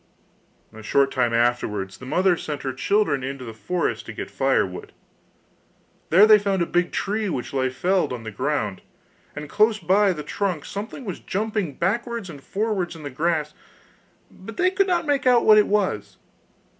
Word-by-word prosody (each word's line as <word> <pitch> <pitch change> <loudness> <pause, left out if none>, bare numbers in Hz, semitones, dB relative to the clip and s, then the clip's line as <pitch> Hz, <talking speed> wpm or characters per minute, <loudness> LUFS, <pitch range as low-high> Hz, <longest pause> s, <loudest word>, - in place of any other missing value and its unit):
A 110 - -11
short 135 +5 +2
time 125 -3 +1
afterwards 115 -5 0
the 125 - -10
mother 180 +5 +3
sent 150 -3 -5
her 130 -1 -2
children 140 -1 +1
into 135 -1 -5
the 115 - -7
forest 175 +10 -2
to - - -6
get - - -7
firewood. - - -1 1.2
There 190 +6 +7
they 215 -1 +7
found 195 -3 0
a - - -1
big 175 +1 0
tree 210 +1 -1
which 130 -6 -4
lay 130 -1 +1
felled 180 +8 0
on 120 -2 -5
the 110 - -6
ground, 105 -3 -2 0.5
and 150 +1 -6
close 215 +6 +3
by 195 +2 +3
the 150 -4 -5
trunk 185 -6 -2
something 220 +6 -6
was 190 - -5
jumping 210 -6 -2
backwards 230 +1 -2
and 145 -3 -11
forwards 195 -1 -2
in 160 - -11
the 145 - -6
grass, 155 +1 -1 0.8
but - - -11
they 365 0 +3
could 390 +1 +2
not 350 -3 +1
make 280 -3 +1
out 245 -2 +5
what 215 -1 +8
it 210 - +3
was. 185 - -1
175 Hz, 180 wpm, -23 LUFS, 135-210 Hz, 1.2 s, what